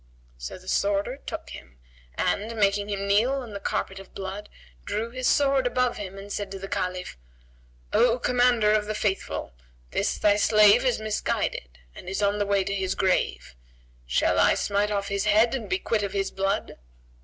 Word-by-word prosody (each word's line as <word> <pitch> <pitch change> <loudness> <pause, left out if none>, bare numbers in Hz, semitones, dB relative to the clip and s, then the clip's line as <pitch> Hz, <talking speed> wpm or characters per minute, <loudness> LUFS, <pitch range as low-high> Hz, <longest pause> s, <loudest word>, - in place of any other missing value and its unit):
So - - -6
the 185 0 -17
sworder 200 +7 0
took - - -6
him 65 -1 -11 0.4
and, 220 +3 -1
making 205 -1 +1
him 200 -1 -2
kneel 215 +6 +3
on 260 -5 -4
the 200 - -5
carpet 195 -1 -3
of 195 - -14
blood, 195 +2 -6 0.3
drew 225 - -3
his 255 0 -2
sword 275 -2 +3
above 250 0 0
him 195 -1 -7
and 200 +1 -7
said 205 -1 -3
to - - -5
the 195 0 -7
Caliph, 180 - -3 0.7
"O 245 0 +4
Commander 245 -3 +3
of 210 -1 +2
the 215 - -2
Faithful, 195 - -2 0.4
this - - 0
thy 205 -1 +3
slave 215 +2 +5
is 250 -4 +1
misguided 205 - -2 0.2
and 180 - -9
is 195 +2 -2
on 200 +1 +1
the 205 - 0
way 200 -1 +2
to 200 +1 -3
his 190 -1 -1
grave; 185 - 0 0.5
shall - - +2
I - - +5
smite 205 +1 0
off 200 -1 -2
his 200 0 -1
head 215 +3 +4
and 260 -4 -4
be 370 - +1
quit 225 - -1
of 200 -1 -3
his 195 -1 -1
blood?" 195 - -2
205 Hz, 190 wpm, -26 LUFS, 195-225 Hz, 0.7 s, slave